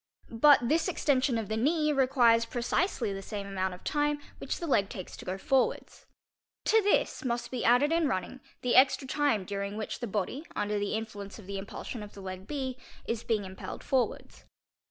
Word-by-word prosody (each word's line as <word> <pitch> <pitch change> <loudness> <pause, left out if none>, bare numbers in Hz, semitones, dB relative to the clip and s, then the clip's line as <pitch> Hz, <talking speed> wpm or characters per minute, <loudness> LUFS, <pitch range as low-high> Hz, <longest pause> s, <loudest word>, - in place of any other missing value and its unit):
But 285 -3 +7
this 320 +6 +2
extension 275 -7 +1
of 220 -2 -3
the 220 - -2
knee 300 +6 +2
requires 250 -4 +4
precisely 240 - -1
the 195 - -5
same 200 0 -5
amount 190 -2 -2
of 180 - -17
time 295 0 0 0.2
which - - -3
the 340 - -4
leg 205 -10 +2
takes 185 - -7
to - - -11
go 185 +1 -3
forwards. 270 +3 0 0.6
To 445 0 +5
this 405 -5 +1
must 240 -2 -2
be 250 -2 -3
added 250 +6 +4
in 330 -2 +3
running 190 +4 -3 0.2
the 250 - +1
extra 265 +1 +5
time 275 -9 +1
during 200 +1 -4
which 215 - -4
the 240 - -3
body 210 - -2
under 210 0 -1
the 205 +1 -1
influence 205 -3 -6
of 215 - -12
the 195 0 -4
impulsion 210 +3 -7
of 210 0 -10
the 200 - -9
leg 185 0 -7
B 260 -3 -3 0.3
is 230 -1 -2
being 215 -4 0
impelled 190 0 -8
forwards. 260 -2 -1
235 Hz, 195 wpm, -30 LUFS, 200-275 Hz, 0.6 s, But